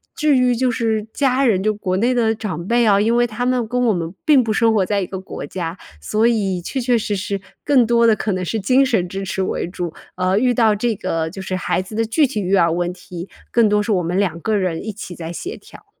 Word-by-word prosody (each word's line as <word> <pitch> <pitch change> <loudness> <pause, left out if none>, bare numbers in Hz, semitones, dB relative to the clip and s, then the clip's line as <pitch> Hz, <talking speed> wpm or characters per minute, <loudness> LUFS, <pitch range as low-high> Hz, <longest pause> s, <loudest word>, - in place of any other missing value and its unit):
至 300 -3 +2
于 250 -1 +3
就 255 +2 +1
是 225 -3 -1
家 270 -1 +2
人， 195 -6 +2
就 215 0 +2
国 190 -3 -2
内 240 +5 +2
的 225 -2 +2
长 185 -6 -5
辈 235 +1 +3
啊， 200 -2 +4
因 225 +3 +2
为 240 0 +4
他 240 +1 -3
们 250 -2 +1
跟 250 +1 0
我 225 - +3
们 170 -2 -3
并 285 -4 +5
不 225 - -2
生 225 0 +3
活 195 -4 +2
在 205 +1 0
一 190 - -1
个 190 - -6
国 190 -6 -7
家， 170 +2 -5 0.2
所 215 - +1
以 195 -6 0
确 265 +9 -3
确 245 -1 +2
实 210 -1 -2
实 200 0 -3 0.2
更 265 -5 +4
多 235 0 +3
的 225 - +6
可 210 - -1
能 185 0 -2
是 220 +5 -2
精 255 +7 +3
神 220 -8 +1
支 195 +2 -5
持 190 0 -3
为 190 - -1
主， 175 -2 -5 0.2
呃， 185 +2 +1
遇 250 +2 +3
到 225 -3 +3
这 230 +3 0
个 160 -1 -2
就 190 +3 -8
是 185 0 -3
孩 185 - -1
子 190 +3 -9
的 225 - +1
具 285 +7 +2
体 245 -5 -3
育 190 +1 +1
儿 170 -3 +4
问 175 +1 -1
题， 180 0 -9 0.2
更 230 -3 +4
多 210 0 +3
是 210 +1 0
我 180 -2 +1
们 175 +3 -1
两 180 -5 0
个 220 +3 0
人 185 -1 -2
一 220 - -3
起 190 -3 -8
在 165 -1 -6
协 365 - -6
调。 - - -16
210 Hz, 285 characters per minute, -20 LUFS, 185-235 Hz, 0.2 s, 的